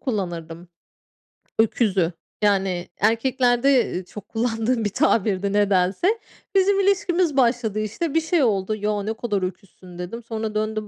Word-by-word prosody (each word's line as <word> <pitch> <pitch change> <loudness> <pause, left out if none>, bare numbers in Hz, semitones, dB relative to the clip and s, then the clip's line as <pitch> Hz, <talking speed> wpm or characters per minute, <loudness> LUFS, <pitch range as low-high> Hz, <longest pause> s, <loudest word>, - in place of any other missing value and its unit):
kullanırdım, 175 - -4 0.9
öküzü. 200 -6 +2 0.3
Yani 190 -4 +1
erkeklerde, 245 +3 +2
ııı, 185 - -3
çok 210 +2 -11
kullandığım 225 0 0
bir 205 - +1
tabirdi 205 -6 +1
nedense. 205 - +2 0.4
Bizim 390 +1 +4
ilişkimiz 365 -6 +1
başladı, 235 -4 +2
işte, 245 - -3
bir 325 - +3
şey 320 -1 +1
oldu. 210 -2 +1
"Ya, 210 -1 -1
ne 220 - -2
kadar 210 -4 -2
öküzsün." 185 -1 -8
dedim. 225 +7 -6
Sonra 220 -1 -4
döndü, 215 0 -2
215 Hz, 130 wpm, -23 LUFS, 195-250 Hz, 0.9 s, Bizim